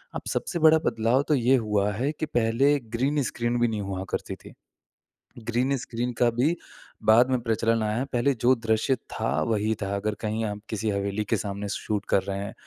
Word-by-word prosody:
अब -, -, -3 dB
सबसे 170 Hz, -, -2 dB
बड़ा 160 Hz, 0 st, +7 dB
बदलाव 115 Hz, +4 st, +2 dB
तो 150 Hz, -, +3 dB
ये 130 Hz, +1 st, +4 dB
हुआ 105 Hz, -4 st, +1 dB
है 130 Hz, +8 st, -1 dB
कि 155 Hz, +1 st, -4 dB
पहले 130 Hz, +2 st, +2 dB, 0.2 s
ग्रीन 140 Hz, +4 st, +1 dB
स्क्रीन 120 Hz, 0 st, -1 dB
भी 120 Hz, -, +3 dB
नहीं 110 Hz, -2 st, -2 dB
हुआ 95 Hz, -1 st, -4 dB
करती -, -, -3 dB
थी। -, -, -14 dB, 0.9 s
ग्रीन 125 Hz, +4 st, +1 dB
स्क्रीन 120 Hz, 0 st, -3 dB
का 120 Hz, -, +4 dB
भी 135 Hz, +9 st, +1 dB, 0.5 s
बाद 120 Hz, +4 st, +6 dB
में 130 Hz, -1 st, +1 dB
प्रचलन 115 Hz, 0 st, +1 dB
आया 110 Hz, +4 st, 0 dB
पहले 125 Hz, +4 st, +2 dB
जो 125 Hz, +2 st, +5 dB
दृश्य 110 Hz, +3 st, +1 dB, 0.2 s
था -, -, -2 dB, 0.2 s
वही 110 Hz, 0 st, +1 dB
था 100 Hz, 0 st, -2 dB
अगर 105 Hz, +1 st, -1 dB
कहीं 110 Hz, +1 st, -2 dB
आप 105 Hz, -1 st, -4 dB
किसी 110 Hz, 0 st, -2 dB
हवेली 100 Hz, +1 st, -1 dB
के 115 Hz, -, 0 dB
सामने 100 Hz, 0 st, -4 dB
शूट 105 Hz, +1 st, -3 dB
कर 95 Hz, -, +3 dB
रहे 100 Hz, 0 st, -4 dB
हैं, 100 Hz, 0 st, -5 dB
115 Hz, 200 wpm, -26 LUFS, 105-125 Hz, 0.9 s, बड़ा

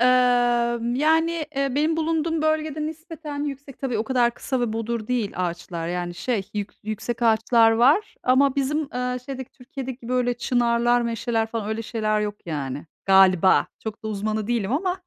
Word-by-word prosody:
Eee, 245 Hz, -, +5 dB, 0.9 s
yani, 320 Hz, +2 st, +2 dB
eee, 275 Hz, -2 st, 0 dB
benim 310 Hz, +3 st, +2 dB
bulunduğum 320 Hz, 0 st, 0 dB
bölgede 310 Hz, -1 st, 0 dB
nispeten 315 Hz, -2 st, -6 dB
yüksek, 275 Hz, -1 st, -7 dB
tabii 250 Hz, -5 st, -2 dB
o 220 Hz, -, 0 dB
kadar 240 Hz, -1 st, +2 dB
kısa 260 Hz, 0 st, -2 dB
ve 235 Hz, -3 st, 0 dB
bodur 225 Hz, 0 st, -3 dB
değil 235 Hz, -5 st, -1 dB
ağaçlar. 170 Hz, -1 st, -3 dB
Yani, 175 Hz, 0 st, -3 dB
şey, 205 Hz, -1 st, -2 dB
yük 205 Hz, -1 st, -3 dB
yüksek 220 Hz, +3 st, -4 dB
ağaçlar 225 Hz, 0 st, +4 dB
var 270 Hz, -, +3 dB
ama 260 Hz, +2 st, +3 dB
bizim, 280 Hz, +2 st, +1 dB, 0.2 s
eee, 250 Hz, 0 st, -1 dB
şeydeki, 260 Hz, -2 st, -6 dB
Türkiye'deki, 255 Hz, -2 st, -8 dB
böyle, 250 Hz, -1 st, +1 dB
çınarlar, 240 Hz, 0 st, +2 dB
meşeler 230 Hz, -1 st, -1 dB
falan 220 Hz, -2 st, -4 dB
öyle 220 Hz, +1 st, -2 dB
şeyler 215 Hz, -1 st, -1 dB
yok 210 Hz, -1 st, -2 dB
yani. 145 Hz, -2 st, -4 dB, 0.2 s
Galiba. 190 Hz, -1 st, +5 dB, 0.2 s
Çok 220 Hz, +1 st, -6 dB
da -, -, -2 dB
uzmanı 215 Hz, 0 st, -2 dB
değilim 230 Hz, -2 st, -1 dB
ama. 365 Hz, +5 st, -1 dB
240 Hz, 165 wpm, -24 LUFS, 215-280 Hz, 0.9 s, Eee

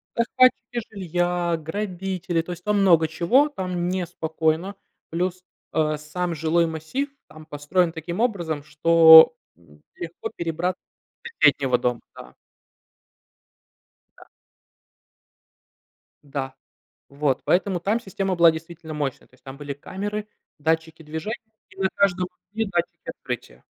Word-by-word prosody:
Захватчики 240 Hz, 0 st, +2 dB
жилья, 175 Hz, -2 st, -1 dB
грабители, 180 Hz, 0 st, -3 dB
то 165 Hz, -, -8 dB
есть 175 Hz, 0 st, -8 dB
там 210 Hz, -1 st, +1 dB
много 170 Hz, -4 st, +5 dB
чего, 175 Hz, -, +3 dB
там 180 Hz, -9 st, -3 dB
неспокойно. 170 Hz, 0 st, -1 dB, 0.3 s
Плюс, 180 Hz, +2 st, -2 dB, 0.3 s
а, 155 Hz, -1 st, +1 dB
сам 170 Hz, +3 st, -3 dB
жилой 165 Hz, +2 st, +2 dB
массив 160 Hz, -, -3 dB, 0.2 s
там 155 Hz, 0 st, -14 dB
построен 160 Hz, +4 st, 0 dB
таким 170 Hz, +4 st, -5 dB
образом, 170 Hz, -, -1 dB
что, 160 Hz, +2 st, +8 dB, 0.2 s
м, 75 Hz, -3 st, -22 dB
легко 170 Hz, 0 st, -6 dB
перебрат 170 Hz, +2 st, -2 dB, 0.5 s
до 470 Hz, -, -7 dB
соседнего 135 Hz, -3 st, +4 dB
дома, 125 Hz, -1 st, -1 dB
да. -, -, -12 dB, 1.8 s
Да. -, -, -15 dB, 2.0 s
Да, 135 Hz, -2 st, -5 dB, 0.5 s
вот, 140 Hz, -2 st, 0 dB
поэтому 185 Hz, +1 st, +2 dB
там 210 Hz, +6 st, 0 dB
система 195 Hz, -3 st, -2 dB
была 170 Hz, -1 st, +7 dB
действительно 160 Hz, 0 st, -8 dB
мощная. 145 Hz, -3 st, -4 dB
То -, -, -26 dB
есть -, -, -27 dB
там 135 Hz, 0 st, -9 dB
были 145 Hz, -1 st, -5 dB
камеры, 205 Hz, +8 st, -5 dB, 0.3 s
датчики 160 Hz, +1 st, -1 dB
движения 160 Hz, +9 st, -4 dB, 0.3 s
и 190 Hz, -, -19 dB
на 190 Hz, -, +3 dB
каждом 185 Hz, -2 st, +2 dB, 0.2 s
пути 225 Hz, +2 st, -1 dB
датчики 175 Hz, -2 st, -3 dB
открытия. -, -, -7 dB
170 Hz, 125 wpm, -24 LUFS, 155-190 Hz, 2.0 s, что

